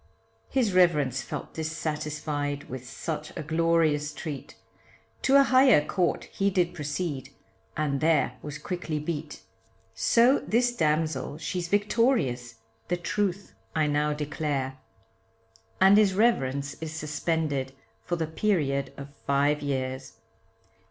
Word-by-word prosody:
His 245 Hz, -7 st, +1 dB
reverence 150 Hz, -8 st, +3 dB
felt -, -, -6 dB
dissatisfied 150 Hz, -2 st, -3 dB
with 130 Hz, -1 st, -7 dB
such 155 Hz, +4 st, -5 dB
a -, -, -3 dB
glorious 160 Hz, -1 st, +2 dB
treat, 150 Hz, -5 st, -6 dB, 0.7 s
To 270 Hz, -, +3 dB
a 280 Hz, -, +8 dB
higher 255 Hz, -, +5 dB
court 180 Hz, 0 st, 0 dB
he 200 Hz, 0 st, -1 dB
did 180 Hz, -2 st, +1 dB
proceed, 150 Hz, -3 st, -3 dB, 0.5 s
and 145 Hz, -3 st, 0 dB
there 155 Hz, -6 st, +2 dB
was 150 Hz, 0 st, -6 dB
quickly 165 Hz, -1 st, -4 dB
beat, 150 Hz, 0 st, -5 dB, 0.5 s
So 235 Hz, -, +4 dB
this 240 Hz, +2 st, +1 dB
damsel 155 Hz, -, 0 dB
she's 170 Hz, +2 st, -3 dB
victorious, 205 Hz, -, +1 dB, 0.3 s
the 175 Hz, -, 0 dB
truth 195 Hz, +2 st, -2 dB, 0.2 s
I 155 Hz, -1 st, +3 dB
now 150 Hz, 0 st, +1 dB
declare, 145 Hz, -3 st, -2 dB, 1.0 s
And 195 Hz, +2 st, +7 dB
his 200 Hz, -3 st, +3 dB
reverence 140 Hz, -, +1 dB
is 160 Hz, -1 st, -4 dB
suspended 150 Hz, -3 st, -2 dB, 0.3 s
for 175 Hz, -, -1 dB
the 165 Hz, -1 st, -1 dB
period 155 Hz, -6 st, 0 dB
of 140 Hz, 0 st, -9 dB
five 145 Hz, +2 st, +2 dB
years. 130 Hz, -2 st, -3 dB
155 Hz, 120 wpm, -27 LUFS, 145-180 Hz, 1.0 s, a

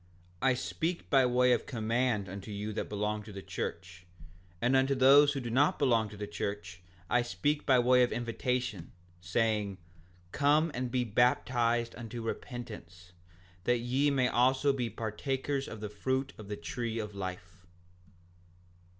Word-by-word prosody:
5:62 -, -, +2 dB
I -, -, +4 dB
speak 165 Hz, +7 st, -3 dB
by 135 Hz, -3 st, +5 dB
way 125 Hz, 0 st, +4 dB
of -, -, -1 dB
command 115 Hz, -3 st, 0 dB
unto 95 Hz, +3 st, -8 dB
you 105 Hz, +1 st, -4 dB
that -, -, -4 dB
belong 105 Hz, +1 st, -2 dB
to 105 Hz, 0 st, -11 dB
the 100 Hz, -1 st, -8 dB
church; 90 Hz, +1 st, -6 dB, 0.5 s
and 120 Hz, +5 st, +2 dB
unto 135 Hz, +1 st, +3 dB
those 140 Hz, +2 st, +6 dB
who 140 Hz, -, -2 dB
do 120 Hz, -3 st, -5 dB
not 140 Hz, +5 st, +3 dB
belong 115 Hz, -6 st, +2 dB
to 105 Hz, -, -11 dB
the 105 Hz, -, -4 dB
church 100 Hz, -3 st, -5 dB, 0.3 s
I 125 Hz, -, +3 dB
speak 145 Hz, +5 st, -1 dB
by 130 Hz, -2 st, +6 dB
way 125 Hz, +1 st, +5 dB
of 125 Hz, -, +3 dB
invitation, 120 Hz, -, -2 dB, 0.3 s
saying: 105 Hz, +2 st, 0 dB, 0.5 s
Come 150 Hz, +3 st, +3 dB
and 125 Hz, 0 st, -2 dB
be 125 Hz, 0 st, 0 dB
baptized 120 Hz, 0 st, +1 dB
unto 115 Hz, 0 st, -7 dB
repentance, 105 Hz, -8 st, -7 dB, 0.5 s
that 120 Hz, -, +3 dB
ye 130 Hz, +5 st, +1 dB, 0.2 s
also 130 Hz, +4 st, +3 dB
may 135 Hz, -, -4 dB
be 120 Hz, -2 st, -1 dB
partakers 135 Hz, +5 st, -3 dB
of 110 Hz, -, -8 dB
the 105 Hz, -, -3 dB
fruit 130 Hz, +6 st, -2 dB
of 105 Hz, -, -11 dB
the 105 Hz, 0 st, -4 dB
tree 115 Hz, +7 st, -4 dB
of 105 Hz, -2 st, -4 dB
life. 90 Hz, -2 st, -7 dB
120 Hz, 160 wpm, -31 LUFS, 105-130 Hz, 0.5 s, those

